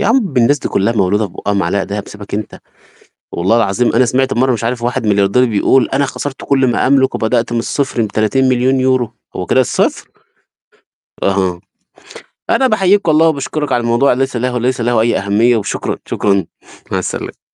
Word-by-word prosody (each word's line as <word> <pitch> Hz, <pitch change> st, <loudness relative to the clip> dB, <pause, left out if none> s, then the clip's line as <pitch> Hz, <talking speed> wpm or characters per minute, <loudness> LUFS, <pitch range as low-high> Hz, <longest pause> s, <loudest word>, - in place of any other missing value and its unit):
يا -, -, 0 dB
عم 225 Hz, -, +1 dB
الناس 140 Hz, +5 st, +3 dB
دي -, -, -4 dB
كلّها 100 Hz, +4 st, 0 dB
مولودة 105 Hz, 0 st, +1 dB
في 85 Hz, -, -16 dB
بُقها 100 Hz, -, -3 dB
معلقة 100 Hz, 0 st, 0 dB
دهب، 100 Hz, 0 st, -5 dB
سيبك 100 Hz, -1 st, -9 dB
أنت، 105 Hz, 0 st, -5 dB, 0.7 s
والله 95 Hz, +7 st, +1 dB
العظيم 115 Hz, +1 st, +1 dB
أنا 125 Hz, +2 st, +4 dB
سمعت 130 Hz, +2 st, 0 dB
مرّة 130 Hz, +2 st, +2 dB
مش 115 Hz, -1 st, -3 dB
عارف 120 Hz, 0 st, -2 dB
واحد 120 Hz, -1 st, -2 dB
ملياردير 100 Hz, +4 st, +3 dB
بيقول: 120 Hz, +3 st, +2 dB
"أنا 140 Hz, +1 st, +1 dB
خسرت 140 Hz, 0 st, -6 dB
كلّ 135 Hz, -2 st, +2 dB
ما -, -, 0 dB
أملك، 135 Hz, -1 st, +3 dB
وبدأت 120 Hz, +1 st, 0 dB
من 120 Hz, -, 0 dB
الصفر 130 Hz, 0 st, -1 dB
ب€30.000.000." 130 Hz, +2 st, +1 dB, 0.2 s
هو 90 Hz, -, -4 dB
كده 130 Hz, -, +3 dB
الصفر؟! 125 Hz, -, -1 dB, 1.1 s
أها. 95 Hz, -3 st, 0 dB, 0.9 s
أنا 265 Hz, -, +3 dB
بحييك 200 Hz, -3 st, +2 dB
والله، 160 Hz, +1 st, +4 dB
وبشكرك 150 Hz, 0 st, -2 dB
على 120 Hz, -, +1 dB
الموضوع، 120 Hz, +4 st, +2 dB
ليس 135 Hz, 0 st, -2 dB
له 125 Hz, +1 st, -1 dB
ليس 125 Hz, 0 st, -1 dB
له 120 Hz, -1 st, +1 dB
أي 115 Hz, +1 st, +1 dB
أهمية. 105 Hz, +5 st, +2 dB
وشكرًا، 105 Hz, -2 st, -3 dB
شكرًا، 100 Hz, -4 st, 0 dB, 0.5 s
مع -, -, 0 dB
السلامة. -, -, -7 dB
120 Hz, 175 wpm, -15 LUFS, 105-135 Hz, 1.1 s, أنا